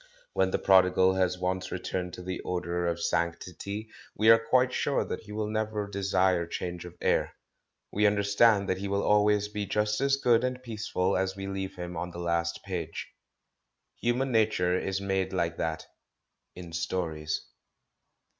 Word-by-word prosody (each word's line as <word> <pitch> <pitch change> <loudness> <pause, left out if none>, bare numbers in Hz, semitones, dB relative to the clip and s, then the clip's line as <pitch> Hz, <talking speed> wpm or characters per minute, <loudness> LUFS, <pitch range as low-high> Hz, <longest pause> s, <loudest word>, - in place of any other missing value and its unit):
When 95 - +2
the - - +1
prodigal 95 -1 +5
has 90 -1 +1
once 90 0 -2
returned 90 -1 -3
to 90 - -9
the 90 0 -4
odour 90 -1 -2
of 85 0 -1
sanc 85 0 0
tity 100 +5 -6 0.3
we 110 +1 +6
are 115 - +7
quite 125 +2 +3
sure 140 - 0
that - - -4
he 105 - -13
will 105 0 -2
never 110 -1 -2
desire 95 -3 +1
change 90 0 -5
of 90 0 -11
air; - - +1 0.6
we 105 +1 +3
understand 100 0 +3
that 95 - 0
he 100 - -3
will 100 0 0
always 105 0 +3
be 105 -1 -4
just 105 +3 0
as 140 0 +3
good 120 -3 +3
and 130 0 -2
peaceful 105 -5 -1
as 95 0 0
we 95 0 -6
leave 95 0 -4
him 90 0 -6
on 90 +2 -3
the 85 - -10
last 85 -1 -1
page. 85 -4 -5 0.9
Human 125 +3 0
nature 105 -6 +2
is 95 +1 -1
m^de 95 -1 -1
like 85 -2 -1
that 80 -1 -2 0.4
— - - -54
in 85 -2 -9
stories. 80 -3 -2
95 Hz, 175 wpm, -29 LUFS, 90-105 Hz, 0.9 s, are